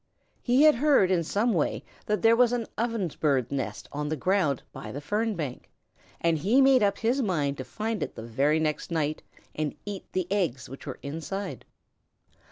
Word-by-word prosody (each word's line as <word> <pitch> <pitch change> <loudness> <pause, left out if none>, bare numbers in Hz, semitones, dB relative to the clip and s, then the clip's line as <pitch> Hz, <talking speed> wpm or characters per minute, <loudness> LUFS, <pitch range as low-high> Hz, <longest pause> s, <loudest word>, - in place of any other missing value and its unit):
He 255 +4 +4
had 310 -1 +8
heard 270 -8 +4
in 175 -2 +2
some 215 +8 +1
way 160 -5 0 0.2
that 210 -3 0
there 225 0 +6
was 245 0 +4
an 240 -2 -1
Ovenbird's 165 - 0
nest 130 -7 -3
on 150 +1 -3
the 155 - 0
ground 165 -4 +1
by 110 - -7
the 140 - -5
fern 210 +8 -1
bank, 145 -7 -5 0.5
and 165 -2 +1
he 215 - +3
made 270 -2 +6
up 200 -1 +2
his 240 +5 +1
mind 150 - 0
to - - -3
find 220 - -3
it - - -4
the 110 - -7
very 140 +7 +1
next 155 -1 -1
night 155 -2 -1 0.3
and 155 -2 -2
eat 205 -2 -7
the 185 -1 0
eggs 160 - 0
which 135 +2 -10
were - - -5
inside. 165 +7 -5
180 Hz, 185 wpm, -27 LUFS, 145-225 Hz, 0.5 s, had